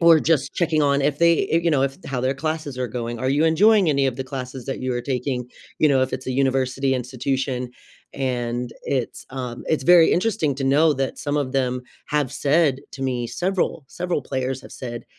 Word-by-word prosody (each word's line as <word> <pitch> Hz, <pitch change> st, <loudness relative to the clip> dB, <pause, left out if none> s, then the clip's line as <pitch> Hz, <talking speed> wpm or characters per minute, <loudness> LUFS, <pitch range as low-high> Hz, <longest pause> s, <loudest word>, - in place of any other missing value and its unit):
or 165 Hz, -1 st, +7 dB
just 145 Hz, -3 st, +1 dB
checking 160 Hz, -3 st, +1 dB
on 140 Hz, -1 st, +3 dB
if 145 Hz, +1 st, 0 dB
they, 170 Hz, -1 st, +4 dB
eh, 165 Hz, -, +3 dB
you 170 Hz, -, +2 dB
know, 140 Hz, -4 st, +2 dB
if 135 Hz, 0 st, -1 dB
how 130 Hz, -2 st, -3 dB
their 130 Hz, +2 st, 0 dB
classes 155 Hz, -1 st, -3 dB
are 125 Hz, -1 st, -2 dB
going. 120 Hz, 0 st, -4 dB
"Are 130 Hz, -, 0 dB
you 145 Hz, +4 st, +2 dB
enjoying 195 Hz, +4 st, +5 dB
any 140 Hz, -2 st, +2 dB
of 130 Hz, -2 st, -2 dB
the 130 Hz, -, -4 dB
classes 130 Hz, -1 st, -6 dB
that 135 Hz, -, -4 dB
you 130 Hz, 0 st, -1 dB
are 120 Hz, -, -1 dB
taking?" 125 Hz, -1 st, -2 dB, 0.3 s
you 155 Hz, -, +4 dB
know, 135 Hz, -2 st, +3 dB
if 130 Hz, -, -2 dB
it's 130 Hz, -, -5 dB
a 130 Hz, -, -1 dB
university 135 Hz, 0 st, +1 dB
institution, 130 Hz, 0 st, -2 dB, 0.4 s
and 125 Hz, -2 st, -2 dB
it's, 130 Hz, -4 st, -3 dB
um, 125 Hz, -2 st, -5 dB
it's 155 Hz, -4 st, 0 dB
very 175 Hz, 0 st, +7 dB
interesting 175 Hz, -7 st, +1 dB
to 135 Hz, -, -2 dB
know 150 Hz, +3 st, +4 dB
that 135 Hz, 0 st, -2 dB
some 145 Hz, 0 st, -2 dB
of 140 Hz, -3 st, -1 dB
them 125 Hz, -2 st, 0 dB, 0.2 s
have 145 Hz, -3 st, 0 dB
said 145 Hz, -1 st, +2 dB
to 135 Hz, -, -7 dB
me, 125 Hz, -2 st, -1 dB
several, 180 Hz, +1 st, -1 dB
several 180 Hz, +3 st, -2 dB
players 130 Hz, -1 st, -3 dB
have -, -, -12 dB
said, 120 Hz, -2 st, -7 dB
135 Hz, 215 wpm, -23 LUFS, 130-150 Hz, 0.4 s, or